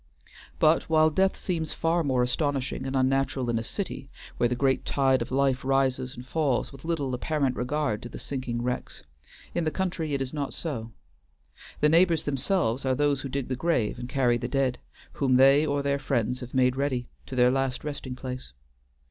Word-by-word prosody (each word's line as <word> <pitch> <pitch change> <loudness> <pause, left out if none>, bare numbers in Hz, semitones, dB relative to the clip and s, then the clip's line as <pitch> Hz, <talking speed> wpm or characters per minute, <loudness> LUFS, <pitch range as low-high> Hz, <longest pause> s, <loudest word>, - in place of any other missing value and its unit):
But 155 +1 +3
while 155 0 +4
death 190 +4 +2
seems 165 -4 -2
far 165 +1 +1
more 130 -4 +2
astonishing 135 0 -1
and 135 - -3
unnatural 130 -1 +1
in 115 - 0
a - - -4
city, 140 - -5 0.3
where 120 - +2
the 125 - 0
great 135 +1 +1
tide 135 -2 +2
of 115 - -3
life 135 0 +1
rises 130 -1 +1
and 125 - -9
falls 135 -2 0
with 135 -1 -13
little 155 -6 -1
apparent 135 0 0
regard 125 -3 -1
to 120 - -7
the - - -8
sinking 125 -3 -4
wrecks, 125 -10 -4 0.5
in 170 - 0
the 155 - +1
country 165 -3 -2
it - - -1
is 135 0 -3
not 145 -2 -3
so. 115 -9 -4 0.9
The 150 - +5
neighbors 165 0 +4
themselves 140 - 0
are 130 -1 +1
those 145 0 +1
who 135 - -5
dig 135 -1 -3
the 130 - -2
grave 125 -7 0
and 120 0 -6
carry 125 -3 +2
the 120 - -3
dead, 135 -3 0 0.3
whom 130 -3 +2
they 135 +4 +6
or 140 -1 0
their 140 0 0
friends 125 -3 -1
have 125 0 -8
made 125 -1 +3
ready, 130 -3 -1 0.2
to 130 - -6
the 125 0 +5
last 135 -1 -1
resting 140 -3 -5
place. 125 - -7
135 Hz, 195 wpm, -27 LUFS, 125-150 Hz, 0.9 s, they